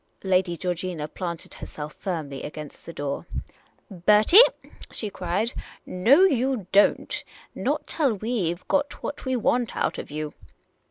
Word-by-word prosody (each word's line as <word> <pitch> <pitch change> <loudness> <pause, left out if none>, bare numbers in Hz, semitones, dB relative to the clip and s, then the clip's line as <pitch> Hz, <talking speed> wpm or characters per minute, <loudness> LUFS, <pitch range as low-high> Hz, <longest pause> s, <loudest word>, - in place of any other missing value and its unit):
Lady 185 -2 +2
Georgina 175 -3 -3
planted 170 0 -6
herself 150 0 -7
firmly 155 -8 -4
against 150 -1 -8
the - - -5
door. 145 -3 -4 0.4
" - - -33 0.2
Bertie," 215 - +8 0.5
she 210 -3 -4
cried, 190 +7 -1 0.3
" - - -43
no, 230 - +4
you 260 - +2
don't 200 +1 +3 0.2
— - - -26
not - - 0
till 285 -7 +1
we 215 -4 -1
've 175 +1 -9
got 285 0 0
what 285 - -5
we 260 0 0
want 240 -1 +1
out - - 0
of - - -7
you 150 0 -4
185 Hz, 155 wpm, -25 LUFS, 165-240 Hz, 0.5 s, Bertie